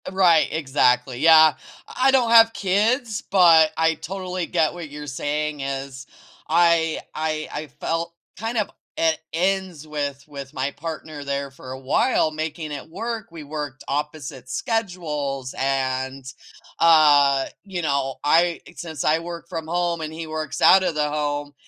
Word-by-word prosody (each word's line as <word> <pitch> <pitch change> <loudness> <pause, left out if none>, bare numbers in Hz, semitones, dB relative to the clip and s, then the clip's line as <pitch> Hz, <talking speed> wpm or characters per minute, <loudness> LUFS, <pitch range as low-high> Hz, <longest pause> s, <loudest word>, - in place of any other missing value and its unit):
Right, 180 -4 +4
exactly, 130 -4 +1
yeah. 160 0 +7 0.4
I 260 +1 +4
don't 255 -4 +3
have 225 -1 +7
kids, 215 +4 0
but 165 -5 +6
I 160 0 +3
totally 185 +1 -5
get 165 -3 +1
what 170 -3 -8
you're 150 +1 -8
saying 150 +2 -2
is. 135 0 -5 0.4
I 165 -1 +3
I 155 0 -2
I 155 - -5
felt 165 +1 -2 0.2
kind 225 +5 -3
of 210 - 0 0.3
at 160 -1 +2
ends 180 -3 -1
with 145 -2 -4
with 140 -2 -9
my 135 +1 -1
partner 155 -2 -7
there 140 0 -3
for 130 -1 -11
a 130 - -7
while 155 - +1
making 155 0 -5
it 145 +2 -7
work. 225 +4 -5
We 165 -2 -9
worked 145 -2 -6
opposite 145 -3 -4
schedules 150 - -3
and, 130 0 -2 0.5
uh, 145 -4 +5 0.2
you 190 -3 -5
know, 140 -3 -1
I 170 +3 +3 0.2
since 160 -5 -6
I 155 +1 +3
work 170 0 -8
from 165 -2 -6
home 175 0 -1
and 155 -1 -4
he 160 +1 -6
works 155 -1 -5
out 190 0 +7
of 175 - -1
the 150 -1 0
home, 145 -1 -3
155 Hz, 150 wpm, -23 LUFS, 140-175 Hz, 0.5 s, yeah